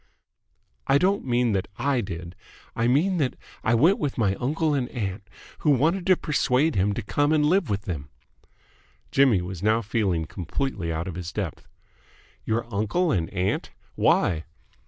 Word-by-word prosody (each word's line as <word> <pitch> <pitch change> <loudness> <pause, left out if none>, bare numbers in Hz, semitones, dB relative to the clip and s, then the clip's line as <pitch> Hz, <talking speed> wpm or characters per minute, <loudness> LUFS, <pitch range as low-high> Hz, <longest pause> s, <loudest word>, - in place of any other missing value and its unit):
"I 135 - +5
don't 195 +5 +1
mean 120 -2 +2
that 95 -2 -1
I 135 0 +1
did. 85 -2 -7 0.4
I 115 0 +1
mean 165 +9 +2
that 135 -6 0 0.3
I 115 - +3
went 165 - +4
with 145 -3 -2
my 100 -5 +2
uncle 155 +4 0
and 130 -3 -1
aunt, 100 -4 -4 0.4
who 150 - +1
wanted 160 +7 +2
to 185 -2 +5
persuade 150 0 +1
him 100 +2 +1
to 115 - -4
come 145 +8 +1
and 150 -1 +3
live 180 +2 +2
with 100 0 -1
them." 75 -9 -5 1.0
Jimmy 130 -10 +4
was 90 -1 -6
now 110 +3 +2
feeling 100 -7 0
completely 90 - -3
out 80 +2 -3
of 95 - -4
his 90 0 -6
depth. 95 -7 -5 0.8
"Your 115 +1 0
uncle 110 - +1
and 85 -4 0
aunt? 95 0 -1 0.2
Why?" 80 -2 +2
115 Hz, 165 wpm, -25 LUFS, 95-145 Hz, 1.0 s, I